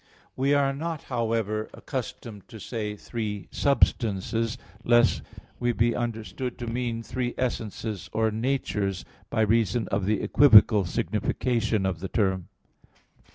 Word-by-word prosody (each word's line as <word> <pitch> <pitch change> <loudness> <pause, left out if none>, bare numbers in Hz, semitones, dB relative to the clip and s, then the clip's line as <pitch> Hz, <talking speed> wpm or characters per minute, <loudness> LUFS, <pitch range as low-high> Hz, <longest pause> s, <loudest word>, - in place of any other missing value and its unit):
We 140 +2 +2
are 140 -1 +2
not, 160 +2 -4
however, 110 -2 -1
accustomed 105 -4 -6
to 115 -3 -11
say 105 -2 -4
Three 105 -3 -5
substances, 115 -3 +1 0.3
lest 120 0 +4 0.4
we 120 0 +1
be 115 +1 +2
understood 120 +2 -4
to 120 - -5
mean 115 -1 -2
three 125 0 -3
essences 110 -6 -3
or 110 0 +1
natures, 105 -5 -1 0.2
by 110 - 0
reason 110 +1 +2
of 95 -1 -1
the 105 -1 +1
equivocal 110 -7 +7
signification 110 +1 0
of 95 -3 -1
the 95 - -4
term. 95 -4 0
115 Hz, 125 wpm, -26 LUFS, 105-120 Hz, 0.4 s, equivocal